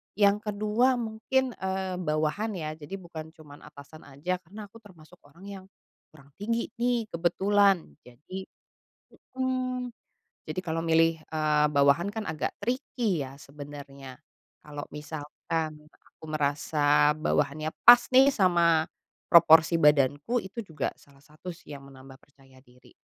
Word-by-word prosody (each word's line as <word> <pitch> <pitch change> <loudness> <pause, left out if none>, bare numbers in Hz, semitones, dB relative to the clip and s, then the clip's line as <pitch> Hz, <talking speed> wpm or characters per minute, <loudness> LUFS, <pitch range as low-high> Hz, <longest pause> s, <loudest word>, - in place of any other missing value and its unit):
Yang 205 +1 +2
kedua 215 +5 +1
mungkin, 240 +3 -1
eee, 190 -1 -3
bawahan 160 +6 -1
ya. 155 -4 -4
Jadi, 155 +4 -8
bukan 165 -4 -10
cuma 145 -2 -14
atasan 150 +3 -14
aja, 165 +7 -4
karena 195 +5 -11
aku 230 - -14
termasuk 180 -5 -18
orang 165 +6 -19
yang 195 -2 -9 0.4
kurang 140 -2 -20
tinggi 230 +3 -2
nih 240 -1 +1
kebetulan. 190 - +1
Jadi 150 +10 -9 0.9
mhm. 255 -1 -2 0.6
Jadi, 155 +3 -3
kalau 165 -3 -3
milih, 165 0 +3
eee, 150 -1 +1
bawahan 140 +5 +3
kan 220 0 -4
agak 155 - -3
tricky 230 - -2
ya 135 +1 -11
sebenarnya. 140 -2 -11 0.4
Kalau 145 -1 -8
misalkan 155 +1 -5 0.2
aku - - -28
merasa 145 0 +2
bawahannya 155 0 -1
pas 240 0 +9
nih 265 +2 +7
sama 170 -6 +3 0.4
proporsi 165 -1 +6
badanku, 145 - +3
itu 195 +2 -7
juga 160 -7 -4
salah 140 -1 -22
satu 155 +4 -11
sih 165 -3 -12
yang 140 -1 -11
menambah 135 0 -14
percaya 135 -2 -22
diri. 125 -1 -22
165 Hz, 135 wpm, -27 LUFS, 145-200 Hz, 0.9 s, pas